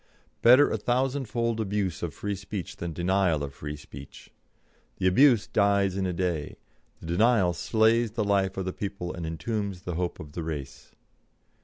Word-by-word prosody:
Better 130 +5 +7
a - - 0
thousandfold 120 -2 0
abuse 100 -4 -2
of 85 - -3
free 100 +8 -4
speech 100 -1 -6
than 85 -1 -4
denial 85 -2 +1
of 70 -1 -5
free 75 +2 -6
speech. 70 -2 -12 0.7
The 95 - -2
abuse 120 +4 +5
dies 100 -2 +2
in 95 -1 -1
a - - -1
day; 85 -4 -2 0.4
the - - -12
denial 95 +1 +3
slays 115 +4 +2
the 115 -2 0
life 100 -2 +1
of 95 - -2
the 95 - -3
people 95 -3 -5
and 85 -2 -5
entombs 100 +2 -3
the 90 - -4
hope 90 +1 -3
of 75 - -9
the 85 - -5
race. 75 -4 -7
95 Hz, 170 wpm, -27 LUFS, 85-110 Hz, 0.7 s, Better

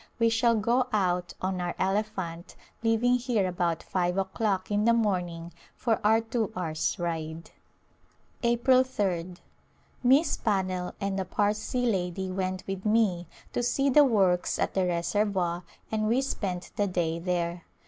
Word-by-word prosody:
We 230 -1 +3
shall 230 +1 +3
go 235 +4 +2
out 180 -4 0
on 185 -1 -1
our 175 0 -3
elephant 190 -3 -2 0.3
leaving 230 +2 +3
here 235 -6 0
about 175 -2 -1
five 180 0 -1
o'clock 195 0 -1
in 205 +1 +2
the 235 - +5
morning 175 -6 -1 0.2
for 230 -3 0
our 220 +2 +4
two 225 -1 -2
hours' 160 -3 -1
ride. 165 -1 -4 0.9
A 235 0 +3
Glimpse 255 +1 +3
of 205 - +4
India 175 -3 0
April - - -10
^d. - - -21 0.6
Miss 275 +5 +4
Pannell 185 -4 -1
and 195 -1 -2
a 190 - -2
Parsee 210 +6 0
lady 190 -3 -1
went 185 0 -2
with 195 -1 -5
me 210 -6 +2 0.3
to - - 0
see 275 +3 +1
the 295 +3 +7
works 195 -9 +2
at - - -1
the 190 -1 +1
reservoir 175 0 0 0.3
and 215 -1 0
we 235 +4 +3
spent 185 -9 -3
the 205 - +2
day 170 -3 -1
there. 175 0 -2
195 Hz, 160 wpm, -28 LUFS, 180-225 Hz, 0.9 s, the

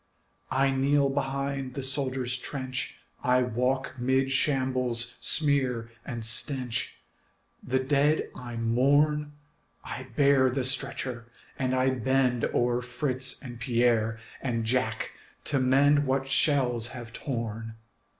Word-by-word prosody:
I 135 +1 +2
kneel 140 +1 +2
behind 140 -1 -2
the 140 - -3
soldier's 130 -2 -1
trench, 130 0 -4 0.2
I 125 0 +3
walk 125 +3 -1
'mid 130 +2 +1
shambles' 130 -4 +1
smear 130 -6 +1
and 115 -3 -5
stench, 125 +1 0 0.6
The 130 +1 0
dead 145 +3 +2
I 120 -1 -7
mourn; 145 +6 +2 0.5
I 130 +1 -7
bear 140 -2 +5
the 130 +1 -1
stretcher 130 -2 -2 0.3
and 130 -1 0
I 130 +1 +3
bend 130 -1 +1
O'er 120 0 +1
Fritz 125 +1 -2
and 120 -3 -8
Pierre 115 -2 +2 0.2
and 115 -4 -1
Jack 110 -2 0 0.3
to 140 - 0
mend 140 +3 +4
What 135 0 0
shells 130 -4 +2
have 120 -2 -9
torn. 115 -4 -4
130 Hz, 120 wpm, -28 LUFS, 120-135 Hz, 0.6 s, bear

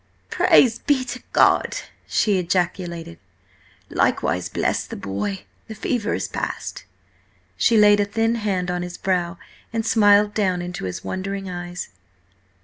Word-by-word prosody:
"Praise 235 -3 +4
be 265 -3 +1
to 255 0 -6
God!" - - +4 0.3
she 205 -4 +2
ejaculated. 170 -1 -2 0.7
"Likewise, - - 0
bless - - 0
the - - -7
boy! 100 0 -4 0.2
The 220 - -7
fever 220 +1 -1
is - - -3
passed." - - -5 0.7
She 230 - +3
laid 205 -1 +6
a 205 - +3
thin 225 +2 0
hand 195 -6 -1
on 180 0 -2
his 180 0 -6
brow, 180 -1 -1 0.3
and 225 -1 -2
smiled 205 -2 +5
down 185 -4 +1
into 175 - -5
his 90 - -5
wondering 195 0 -4
eyes. 175 0 -6
190 Hz, 140 wpm, -22 LUFS, 175-215 Hz, 0.7 s, laid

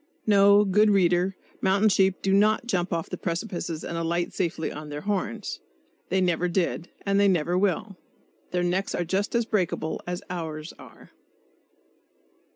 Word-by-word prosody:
No, 200 0 +6
good 210 +2 +4
reader, 185 -1 +2 0.3
mountain 200 +3 +3
sheep 190 -1 +2
do 195 - +2
not 215 +3 +3
"jump 180 -6 -1
off 165 -1 -2
precipices 170 -2 -3
and 170 - -5
alight 170 +1 -1
safely 165 -3 -2
on 150 0 -8
their 145 0 -5
horns." 200 - -3 0.5
They 190 - +1
never 180 -1 +1
did; 175 -1 -1 0.2
and 200 0 +2
they 200 - +5
never 175 -2 +1
will. 195 +1 0 0.5
Their 180 0 -1
necks 180 +3 -1
are 175 - -1
just 195 +6 -1
as 235 -1 +2
breakable 180 -7 -1
as 175 0 -4
ours 160 -3 -5
are. - - -15
185 Hz, 155 wpm, -26 LUFS, 170-200 Hz, 0.5 s, No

